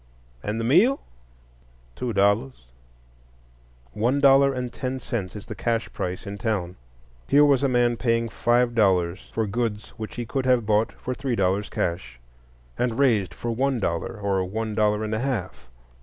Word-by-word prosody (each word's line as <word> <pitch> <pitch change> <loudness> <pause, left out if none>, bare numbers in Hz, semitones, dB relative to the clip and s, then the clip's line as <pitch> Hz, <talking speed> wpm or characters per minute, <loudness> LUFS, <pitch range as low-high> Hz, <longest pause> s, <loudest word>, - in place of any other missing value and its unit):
"And 105 +2 -3
the - - -2
meal?" 190 - +4 1.0
"Two 125 - -3
dollars." 100 - +1 1.3
One 120 +6 +1
dollar 140 0 +6
and 125 -2 -4
ten 130 0 -3
cents 110 -8 -4
is 105 - -8
the - - -6
cash 115 -1 -2
price 90 +3 -4
in 100 0 -6
town. 95 -6 -2 0.5
Here 145 +1 +6
was 140 -3 +4
a 140 - +3
man 120 -1 +2
paying 115 -1 +1
five 120 +1 +1
dollars 95 -5 +1
for 110 - -1
goods 105 0 -2
which 110 -1 -6
he 120 - -4
could 130 +2 -2
have 125 -3 +3
bought 110 +1 +2
for 130 - -5
three 130 -1 -2
dollars 100 0 0
cash, 85 -9 -3 0.6
and 120 -2 0
raised 115 -9 +2
for 120 - -3
one 130 +2 0
dollar 85 +2 -2
or 100 -2 0
one 110 +4 -3
dollar 105 0 +1
and 110 0 -3
a 110 - 0
half. 95 - -4
115 Hz, 170 wpm, -24 LUFS, 100-125 Hz, 1.3 s, dollar